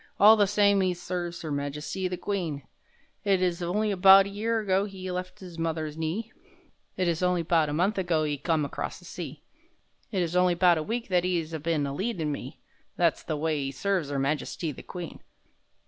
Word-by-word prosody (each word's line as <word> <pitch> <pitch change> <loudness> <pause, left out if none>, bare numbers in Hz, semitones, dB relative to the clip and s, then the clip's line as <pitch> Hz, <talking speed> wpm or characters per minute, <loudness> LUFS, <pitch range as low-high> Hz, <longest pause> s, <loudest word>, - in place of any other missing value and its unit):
(All 215 +2 +9
the 205 -2 +3
same 200 -1 +4
'e 185 -1 +1
serves 175 -1 -5
'Er 155 - -3
Majesty 150 +6 -3
the 180 0 -4
Queen!) 170 -9 -3 0.6
It 195 -2 +3
is 180 -1 0
only 205 +5 0
'bout 195 +1 +8
a - - -5
year 220 +3 -1
ago 195 -1 +1
'e 185 -1 -6
left 180 +1 -5
'is 175 -2 -9
mother's 160 -2 -2
knee, 165 +8 -3 0.7
It 185 - +1
is 170 0 0
only 180 -1 +2
'bout 165 -2 +2
a - - -2
month 190 +6 +1
ago 170 -4 +1
'e 145 -2 -2
come 155 0 +1
acrost - - -4
the - - -16
sea, - - -7 0.7
It 190 -4 +1
is 170 +1 -3
only 180 -1 +4
'bout 175 -2 +4
a - - -1
week 230 +7 -3
that 180 -2 +3
'e 180 -1 +1
'as 160 -1 -6
been 160 -1 0
aleadin' 160 +2 -2
me. 135 -2 -6 0.4
(That's 170 -2 +2
the 155 - -3
way 155 0 0
'e 135 -1 -2
serves 175 0 -1
'Er 140 - -1
Majesty 150 +3 -1
the 135 - -10
Queen!) 175 -3 -8
175 Hz, 205 wpm, -27 LUFS, 155-190 Hz, 0.7 s, All